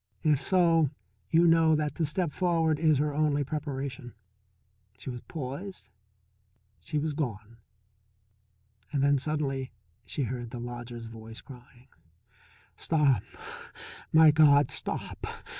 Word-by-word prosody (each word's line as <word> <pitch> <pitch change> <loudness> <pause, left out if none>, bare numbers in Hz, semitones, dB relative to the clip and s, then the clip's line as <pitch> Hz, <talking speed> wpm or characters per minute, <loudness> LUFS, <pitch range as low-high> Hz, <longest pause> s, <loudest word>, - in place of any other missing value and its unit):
If 150 -4 +3
so 165 -5 +3 0.4
you 165 +1 +4
know 165 -1 +5
that 150 -1 -1
to 160 - -1
step 170 +1 -1
forward 165 -4 +1
is 155 -3 +4
her 150 +1 0
only 145 -1 +1
preparation. 140 -3 -5 0.8
She 130 - -7
was 120 -1 -7
poised, 160 +6 -7 0.9
she 150 - -4
was 150 +1 -1
gone. 115 -6 -4 1.3
Then 140 -1 +2
suddenly 135 -3 -2 0.3
she 145 - -3
heard 120 -1 -4
the 120 - -7
lodger's 120 -1 -7
voice 115 0 -10
crying: 125 -1 -15 0.9
"Stop 150 -6 +2 0.9
my 160 -1 +7
God, 145 -2 +5
stop! - - -5
145 Hz, 115 wpm, -28 LUFS, 125-155 Hz, 1.3 s, my